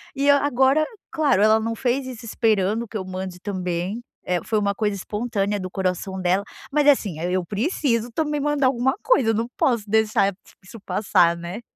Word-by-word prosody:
e 280 +1 0
eu 285 - +7
agora, 275 +1 +3 0.3
claro, 300 -10 +2
ela 220 +1 +5
não 230 +1 -2
fez 255 +3 -1
isso 245 -2 -8
esperando 220 0 +1
que 220 - -5
eu 190 - -5
mande 185 -1 -6
também, 185 +3 -3 0.2
eh, 180 -1 -1
foi 220 - -1
uma 200 -1 +1
coisa 210 0 -1
espontânea 210 0 -2
do 185 - -5
coração 190 0 -2
dela, 185 +2 +1 0.3
mas 295 0 +2
assim, 205 - +3
aí 175 +2 -2
eu 185 -2 0
preciso 235 - -1
também 300 +3 -1
mandar 295 -1 +1
alguma 260 +3 +1
coisa, 265 - +3
eu - - +3
não 230 +1 -1
posso 235 -5 +1
deixar 215 -2 +2
e 190 - -8 0.3
isso 230 +3 -11
passar, 175 -4 +2
né. 175 +6 -6
215 Hz, 195 wpm, -23 LUFS, 190-255 Hz, 0.3 s, eu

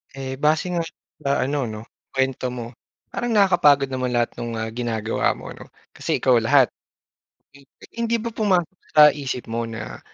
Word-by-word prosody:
Eh, 130 -1 -5
base 155 +3 +2
nga 175 -1 0 0.4
sa 140 -3 +1
ano 140 -1 -1
'no, 110 -1 -6 0.3
kuwento 130 -1 0
mo. 120 -2 -6 0.4
Parang 240 -1 -2
nakakapagod 150 -9 +4
naman 130 -1 -2
lahat 120 0 +1
nung, 115 -1 -4
ah, 110 0 -3
ginagawa 115 -2 -1
mo - - -9
'no, - - -11 0.2
kasi - - -2
ikaw 125 -3 +5
lahat. 130 +3 +4 0.8
Hmm, 140 - -16 0.3
hindi 235 0 0
ba 230 +1 -4
pumasok 190 -4 +1 0.2
sa 150 -1 +9
isip 135 -4 -4
mo 115 +1 -2
na 115 0 -7
135 Hz, 165 wpm, -23 LUFS, 120-155 Hz, 0.8 s, sa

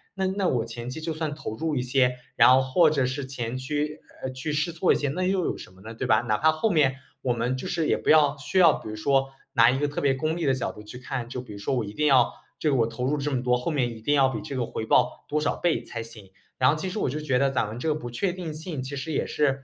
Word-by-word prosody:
那 190 -1 -1
那 190 0 0
我 120 -7 0
前 120 +1 -7
期 130 - -6
就 160 0 -3
算 155 -2 -3
投 110 -7 -6
入 160 +3 -2
一 125 - 0
些， 125 0 +2 0.2
然 - - +7
后 130 +1 +6
或 155 +5 +4
者 140 -4 +1
是 135 +1 -3
前 120 -3 -4
期， 150 +3 -3 0.2
呃， 130 - -2
去 130 +4 -4
试 155 +3 0
错 170 +2 +2
一 - - +4
些， 145 - -1
那 155 +7 -3
又 190 -2 +1
有 - - -1
什 - - -11
么 95 +1 -19
呢， 110 +2 -8
对 120 +3 -4
吧？ 110 -2 +4
哪 110 -3 0
怕 160 +1 +4
后 155 +8 0
面 145 -6 +3 0.3
我 125 - 0
们 120 +2 0
就 130 - -5
是 165 -3 -1
也 - - +3
不 - - -3
要 150 -2 +5
需 150 +7 -3
要 170 -4 +7
比 - - -7
如 110 - -5
说 135 +5 +1 0.2
拿 115 0 +6
一 130 - +1
个 145 - +1
特 145 - -4
别 140 -1 +3
功 155 +4 -1
利 170 - -2
的 135 - +3
角 130 - -2
度 105 - -12
去 105 +3 -10
看， 125 -1 -5
就 125 0 -4
比 110 - -10
如 100 - -9
说 100 +6 -1
我 120 -3 -1
一 100 - -8
定 150 +6 +1
要 130 -4 +4 0.2
这 155 - 0
个 - - +2
我 115 -3 +3
投 115 +2 -4
入 145 +3 +1
这 145 +1 -2
么 130 -3 -1
多， 125 -1 +3
后 125 +7 -2
面 125 -6 0
一 110 - -12
定 145 +6 +2
要 135 -2 +5
比 115 -5 -4
这 145 -3 -6
个 125 -2 0
回 110 - -5
报 - - +2
多 150 - +1
少 150 - 0
倍 175 -2 0
才 115 - -5
行。 110 -4 -10 0.3
然 130 0 +4
后 150 - +3
其 185 +4 -3
实 210 - -3
我 - - 0
就 140 - -3
是 155 - -6
觉 130 -4 +2
得 140 +1 +3
咱 130 -4 0
们 110 +3 -7
这 160 - -1
个 150 - +1
不 120 -6 -6
确 175 +10 0
定 175 -3 -6
性， 155 -3 -5
其 135 +2 -5
实 140 +4 -4
也 - - 0
是 135 -2 0
135 Hz, 340 characters per minute, -26 LUFS, 125-155 Hz, 0.3 s, 然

